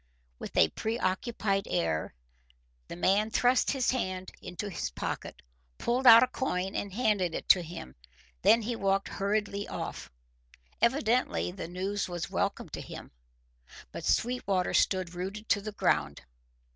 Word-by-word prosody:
With - - -7
a 80 - +6
preoccupied 200 - -1
air, 80 -4 -1 0.7
the - - -7
man 200 +4 +2
thrust 245 +3 +3
his 265 -3 +1
hand 185 -7 -3
into 180 +3 -6
his 195 - -3
pocket, - - -5 0.3
pulled 250 +2 +1
out 230 0 +11
a - - +2
coin, 190 -8 -2
and 200 - -3
handed 200 -6 +1
it - - -5
to 185 - +7
him. 165 - -8 0.5
Then 230 0 +5
he 235 +2 -2
walked 195 -2 0
hurriedly 205 0 -1
off. - - -6 0.7
Evidently 240 - +1
the 180 -2 -6
news 190 +3 -3
was 175 -2 -4
welcome - - -1
to - - -6
him. - - -9 0.8
But - - -7
Sweetwater 200 -7 0
stood 185 -2 +2
rooted 195 +5 -5
to 205 - +3
the 215 +1 -5
ground. 70 - 0
200 Hz, 145 wpm, -29 LUFS, 185-225 Hz, 0.8 s, out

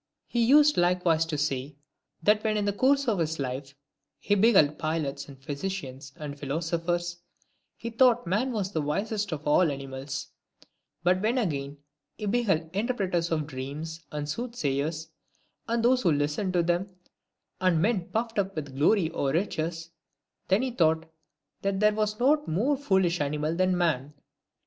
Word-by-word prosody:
He 240 -1 0
used 295 +5 +6
likewise 175 -2 +2
to 155 -2 -2
say, 140 -1 -2 0.2
" - - -38
that 210 +2 +4
when 215 -1 +1
in 205 - 0
the 205 - +1
course 275 +5 +2
of 210 -6 +1
his 160 -1 -1
life 135 +1 -4 0.4
he 205 - 0
beheld 190 -8 +4
pilots, 155 -3 -2
and 140 -2 -12
physicians, 140 -1 -5
and 145 -1 -7
philosophers, 170 +4 -2 0.6
he 230 - -5
thought 245 -1 +4
man 210 +9 0
the 195 -7 -2
wisest 200 +7 -2
of 150 -2 -5
all 155 +2 +4
animals; 135 0 -6 0.7
but 185 +1 +3
when 225 +5 +1
again 145 - -2 0.4
he 210 - -5
beheld 195 -8 +1
interpreters 195 -7 0
of 155 -2 0
dreams, 150 +4 -6
and 150 -1 -4
soothsayers, 160 - -2 0.6
and 235 0 0
those 250 +1 +4
who 175 - +3
listened 150 +6 0
to 175 -1 +3
them, 175 +3 0 0.7
and 185 -3 +3
men 195 -1 +1
puffed 225 -1 -1
up 195 0 -1
with 145 -4 -5
glory 165 +4 +3
or 140 -4 -1
riches^ 165 -1 -2 0.6
then 195 +6 +3
he 260 - -1
thought 160 -6 +2 0.6
that 195 -1 -1
there 210 0 +4
was 215 0 -1
not 295 +4 +3
a - - -4
more 230 - +2
foolish 190 - +1
animal 150 +2 -1
than 185 0 +2
man." 150 -5 0
175 Hz, 160 wpm, -27 LUFS, 150-210 Hz, 0.7 s, used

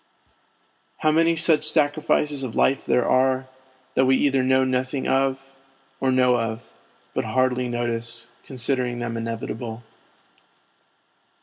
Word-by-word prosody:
How 155 - +3
many 165 +1 +3
such 160 -2 +3
sacrifices 150 -1 +1
of 125 -4 -5
life 135 - +1
there 125 - +2
are, 130 0 +2 0.5
that 130 - +3
we 130 - +5
either 135 -1 +2
know 130 +1 +3
nothing 130 +1 -1
of, 135 0 +1 0.6
or 135 -1 +1
know 125 -1 +3
of, 115 0 -3 0.5
but - - -1
hardly 130 -1 0
notice 120 -1 -3 0.2
considering 125 -1 -2
them 120 -1 -4
inevitable. 115 0 -5
130 Hz, 120 wpm, -23 LUFS, 120-135 Hz, 0.6 s, we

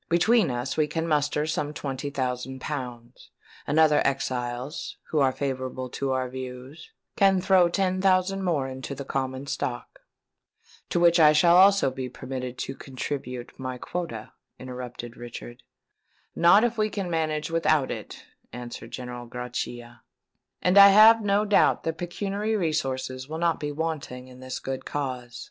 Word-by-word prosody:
Between 180 +3 +4
us 125 +2 -3
we 155 -1 +2
can 160 +2 -2
muster 150 -1 +1
some 150 -1 -2
twenty 140 0 -4
thousand 130 -1 -3
pounds; 125 -4 -7 0.4
and 150 - 0
other 155 -2 +5
exiles, 125 +1 -3
who 155 - +2
are 135 -2 +4
favourable 130 -2 -4
to 135 -1 -2
our 130 -1 0
views, 130 - -8 0.3
can 195 -2 +4
throw 185 -1 +4
ten 185 +1 0
thousand 190 0 +2
more 155 -7 0
into 130 +1 -6
the 140 - -7
common 130 0 -3
stock." 120 -3 -4 0.9
"To - - +1
which 170 0 +5
I 155 -1 +7
shall 170 +3 +5
also 195 -5 +6
be 130 0 -5
permitted 125 0 -6
to 135 - -4
contribute 130 -2 -6
my 130 -1 -4
quota," 125 -7 -5 0.3
interrupted 125 -2 -8
Richard. 120 0 -9 0.7
"Not 175 +6 +6
if 235 -1 0
we 215 0 +2
can 200 -3 -4
manage 160 -2 -1
without 155 -4 +2
it," - - -7 0.3
answered 120 -1 -8
General 125 -1 -7
Grachia; 120 -1 -6 0.6
"and 180 +2 +5
I 200 - +11
have 215 +3 +8
no 205 +1 +2
doubt 205 -1 +3
that 165 0 -3
pecuniary 200 +5 -2
resources 135 -7 -2
will 160 - -4
not 170 -1 +1
be 145 0 -3
wanting 145 -5 -4
in 125 0 -14
this 130 0 -5
good 135 0 -5
cause." 125 -4 -4
140 Hz, 155 wpm, -26 LUFS, 125-170 Hz, 0.9 s, I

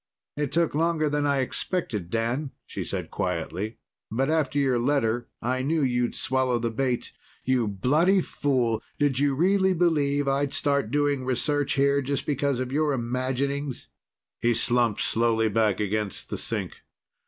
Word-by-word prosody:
"It 145 -2 -2
took 170 -1 +1
longer 160 0 +1
than 145 0 0
I 140 -1 +2
expected, 125 - -2
Dan," 120 +7 -1 0.2
she - - -5
said - - -5
quietly. 90 +5 -3 0.3
"But 135 +7 0
after 155 -3 +1
your 130 -4 +2
letter, 120 -3 +1 0.2
I 130 +2 0
knew 155 +3 +1
you'd 125 -2 0
swallow 130 -1 +1
the 115 0 -2
bait. 125 +1 -1 0.3
You 125 -3 +2
bloody 150 - +3
fool! 130 -9 0 0.2
Did 145 -3 +1
you 140 -1 +2
really 190 +4 +3
believe 145 -5 +2
I'd 140 +1 0
start 140 -6 +1
doing 145 0 +1
research 145 +3 0
here 140 0 +3
just 140 +1 -2
because 140 -2 0
of 130 0 -3
your 150 +1 +1
imaginings?" 130 +3 -2 0.5
He 120 0 +2
slumped 120 -2 +2
slowly 115 -1 +2
back 110 -1 +1
against 105 -1 -2
the - - -2
sink. - - -2
135 Hz, 155 wpm, -26 LUFS, 120-145 Hz, 0.5 s, bloody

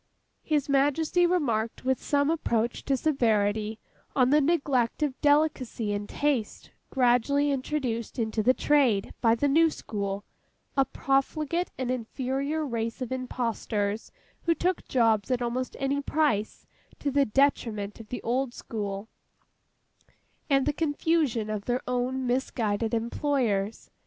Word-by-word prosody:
His 295 -3 0
Majesty 290 +5 +3
remarked, 240 -11 0
with 260 0 +1
some 285 +1 +2
approach 235 -7 -1
to 270 - +1
severity, 220 -6 +1 0.4
on 255 -1 +4
the 300 +1 +5
neglect 280 -4 +1
of 275 -3 -2
delicacy 290 -7 +2
and 205 0 -4
taste, 280 -7 -1 0.2
gradually 265 +3 +3
introduced 255 -5 -2
into 220 -2 0
the 255 +4 +4
trade 260 -9 +2
by 225 -1 +4
the 285 +5 +1
new 325 +4 +5
school: 200 -7 -4 0.5
a 270 -1 +4
profligate 305 +7 0
and 255 -1 -1
inferior 270 +5 -2
race 230 -2 -3
of 255 -2 -4
impostors 230 -4 -2 0.3
who 335 -1 +2
took 365 +1 -1
jobs 225 -4 +2
at 255 -2 +1
almost 250 +2 -2
any 275 +1 0
price, 280 -8 0 0.3
to 285 - -2
the 280 +1 +4
detriment 215 -5 0
of 225 - -11
the 250 - -5
old 250 +1 -1
school, 205 -2 -5 1.4
and 275 -1 +3
the 295 - +1
confusion 295 -6 0
of 215 -1 -4
their 245 +1 -1
own 250 +1 -1
misguided 230 -3 0
employers. 230 -4 -1
255 Hz, 130 wpm, -27 LUFS, 225-285 Hz, 1.4 s, the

